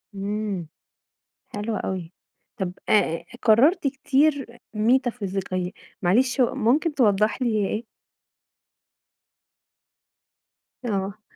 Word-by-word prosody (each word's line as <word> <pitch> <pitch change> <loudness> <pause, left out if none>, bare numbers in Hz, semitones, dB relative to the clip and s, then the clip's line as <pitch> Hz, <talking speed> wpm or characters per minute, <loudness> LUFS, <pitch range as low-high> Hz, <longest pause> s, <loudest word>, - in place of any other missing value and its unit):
آمم. 200 -3 -3 0.8
حلو 210 +1 -3
أوي، 185 -3 -4 0.5
طب 185 -2 -1 0.2
آآ، 170 -5 +2 0.2
كررت 280 - +5
كتير 275 -2 +1 0.2
ميتافيزيقية، 210 -6 0 0.3
معلش 245 +9 +2
ممكن 265 +6 +2
توضح 215 -2 +2
لي 245 - +2
هي - - +1
إيه؟ 220 +2 -3 3.0
آه. 200 -2 -2
215 Hz, 80 wpm, -24 LUFS, 195-260 Hz, 3.0 s, كررت